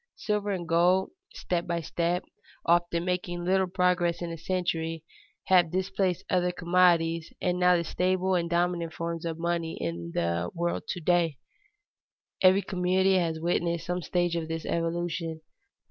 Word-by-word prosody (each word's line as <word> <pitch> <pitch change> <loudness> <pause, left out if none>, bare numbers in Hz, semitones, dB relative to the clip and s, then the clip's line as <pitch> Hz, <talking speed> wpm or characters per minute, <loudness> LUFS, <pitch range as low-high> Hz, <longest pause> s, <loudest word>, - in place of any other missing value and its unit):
Silver 210 -1 -1
and 180 -4 -3
gold, 180 - +3 0.2
step 175 -1 -2
by 170 -1 -1
step, 170 +2 -1 0.4
often 170 0 +2
making 175 -1 -2
little 190 +1 +2
progress 180 -1 +1
in 170 -1 -4
a - - -4
century, 165 -2 -2 0.4
have 180 -3 +4
displaced 190 0 -1
other 180 -1 +1
commodities, 170 -2 +2
and 180 0 0
are 180 0 +6
the 170 - -1
staple 185 +3 0
and 170 -2 0
dominant 170 -1 0
forms 170 0 -4
of 165 -1 -3
money 170 -1 -2
in 85 0 -4
the 85 0 0
world 170 0 -2
to 180 - -3
day. 170 -3 +2 1.0
Every 190 +1 +5
community 185 +1 +2
has 165 -2 -1
witnessed 170 0 0
some 180 +1 -2
stage 175 +1 0
of 165 -1 -2
this 165 -1 -4
evolution. 165 -1 -2
175 Hz, 150 wpm, -28 LUFS, 165-180 Hz, 1.0 s, are